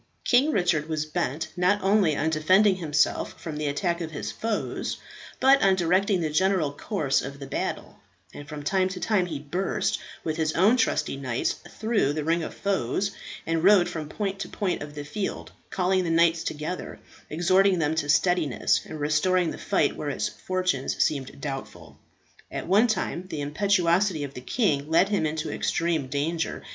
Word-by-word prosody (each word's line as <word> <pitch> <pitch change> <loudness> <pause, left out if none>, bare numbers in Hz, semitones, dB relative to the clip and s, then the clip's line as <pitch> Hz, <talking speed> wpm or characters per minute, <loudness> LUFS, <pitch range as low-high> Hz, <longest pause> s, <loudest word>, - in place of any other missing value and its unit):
King 260 +4 +4
Richard 175 - +1
was 155 -1 -1
bent 150 -1 -2
not 180 +3 +2
only 195 -6 +3
on 160 +2 0
defending 185 +6 +4
himself 150 -4 0
from 155 -3 -6
the 150 -1 -2
attacks 170 +4 -1
of 165 - -3
his 155 - -5
foes, 225 -1 -3 0.4
but 275 +1 +5
on 195 -1 +4
directing 185 +2 +2
the 155 -2 -1
general 185 -2 +2
course 145 -2 -1
of 140 +1 -7
the 140 - -8
battle; 135 - -4 0.3
and 145 - -10
from 150 -1 -6
time 185 +4 +1
to 185 -1 -6
time 200 -4 +1
he 160 -4 -4
burst, 165 +7 -1 0.2
with 155 -1 -2
his 155 -1 0
own 200 +8 +4
trusty 225 - 0
knights, 130 -3 -1 0.2
through 215 -10 +1
the 155 0 -2
ring 165 +2 +1
of - - -6
foes, 200 0 -1 0.3
and 165 0 -1
rode 195 -2 +6
from 155 -2 -5
point 195 +2 -3
to - - -5
point 190 -4 -2
of 145 0 -8
the 145 -1 -6
field, 195 +7 -4 0.2
calling 185 0 +1
the 170 - -2
knights 165 0 +3
together, 155 +4 -5 0.3
exhorting 185 +4 +3
them 160 -2 +1
to 160 -2 -2
steadiness, 155 - +2
and 155 - -7
restoring 165 +4 +2
the - - -7
fight - - +1
where - - -4
its - - -1
fortunes 185 -8 -2
seemed 140 -3 -1
doubtful. 135 -2 -7 0.5
At - - -5
one 205 +7 +4
time 185 -5 -2
the 150 - -4
impetuosity 180 +2 +1
of 140 -1 -6
the 125 - -8
king 150 - 0
led 175 +4 +4
him 200 -7 +1
into 155 0 -3
extreme 165 -5 0
danger. 155 +5 -2
165 Hz, 180 wpm, -26 LUFS, 150-190 Hz, 0.5 s, rode